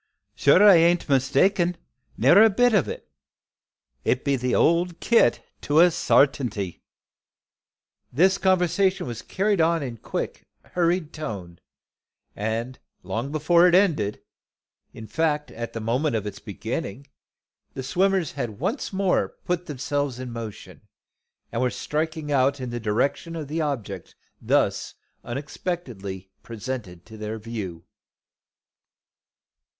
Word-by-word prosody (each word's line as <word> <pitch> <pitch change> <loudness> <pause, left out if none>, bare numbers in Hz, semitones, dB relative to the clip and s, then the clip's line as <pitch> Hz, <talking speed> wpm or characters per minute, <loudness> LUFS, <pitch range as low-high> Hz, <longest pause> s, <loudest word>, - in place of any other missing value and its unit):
Sure 140 - +5
I 195 -4 +9
bean't 170 +1 +3
mistaken, 165 +7 +2 0.4
ne'er 195 +4 +6
a 225 - +7
bit 245 +3 +3
o' 195 -8 +2
it. - - -7 1.0
It 125 - 0
be 140 -1 +2
the 125 -1 -1
old 170 +1 +2
kit 230 - +3 0.2
to 150 +2 +2
a 175 +1 +7
sartainty." 125 - +1 1.3
This 190 +9 +3
conversation 185 0 +2
was 120 -2 -6
carried 200 -2 0
on 165 -1 +2
in 125 -3 -4
a - - -30
quick, - - -5 0.2
hurried 175 -2 0
tone, 95 - -6 0.8
and 115 +4 -3 0.2
long 110 +9 -3
before 170 +3 +4
it 175 - +4
ended, 150 - +2 0.7
in 110 - -10
fact 150 +3 -1
at 115 0 -6
the 115 - -4
moment 120 +5 0
of 105 -2 -2
its 105 - -6
beginning, 115 +9 -5 0.7
the 130 - -4
swimmers 185 +3 +1
had 110 -4 -5
once - - -2
more 190 -1 0
put 180 0 -2
themselves 145 -2 -2
in 130 -1 -6
motion, 115 -3 -8 0.7
and 115 - -2
were 130 - +2
striking 155 +2 -3
out 140 0 +2
in 125 -2 -5
the 120 - -3
direction 120 +9 -1
of 155 -3 -5
the 160 +3 -2
object 115 - -4 0.3
thus - - 0 0.3
unexpectedly 120 - -5
presented 110 -6 -7
to 110 -1 -12
their 110 +1 -5
view. 105 -7 -6
140 Hz, 130 wpm, -24 LUFS, 115-170 Hz, 1.3 s, I